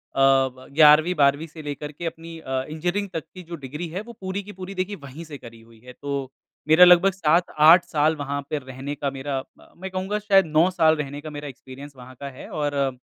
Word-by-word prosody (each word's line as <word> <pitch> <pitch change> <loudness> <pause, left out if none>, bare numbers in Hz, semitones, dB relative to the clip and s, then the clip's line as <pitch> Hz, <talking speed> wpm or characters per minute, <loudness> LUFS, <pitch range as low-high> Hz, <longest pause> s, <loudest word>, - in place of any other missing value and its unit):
अ, - - -2
ब 135 -1 +2
11वीं, 155 +3 +6
12वीं 140 +2 +2
से 160 0 -11
लेकर 145 0 -6
के 160 +4 -8
अपनी 165 0 -7
अ, 130 -3 -3
इंजीनियरिंग 175 +6 -2
तक 165 - -3
की 185 -1 -10
जो 170 - -5
डिग्री 150 +3 -7
है, 185 +5 -5
वो 235 +2 -11
पूरी 190 +1 -3
की 205 - -10
पूरी 190 0 -8
देखिए 185 +3 -3
वहीं 140 +4 -9
से 155 -3 -9
करी 115 -3 -13
हुई 115 0 -20
है। 125 - -11
तो, 140 -1 -5 0.4
मेरा 160 +3 +8
लगभग 180 +2 +6
7-8 170 -1 +4
साल 155 +1 +1
वहाँ 145 -1 -4
पे 150 - -1
रहने 135 +2 -7
का 140 0 -2
मेरा 135 0 -4
अ, - - -16
मैं 190 +2 -6
कहूँगा 190 +3 -2
शायद 195 -2 +4
9 160 +3 +3
साल 160 -3 +3
रहने 145 -1 -5
का 155 - -8
मेरा 145 -1 -7
एक्सपीरियंस 135 +1 -11
वहाँ 130 +1 -12
का 140 - -6
है। 130 - -11
और 145 -1 -2
अ, 140 -1 0
150 Hz, 230 wpm, -23 LUFS, 140-175 Hz, 0.4 s, मेरा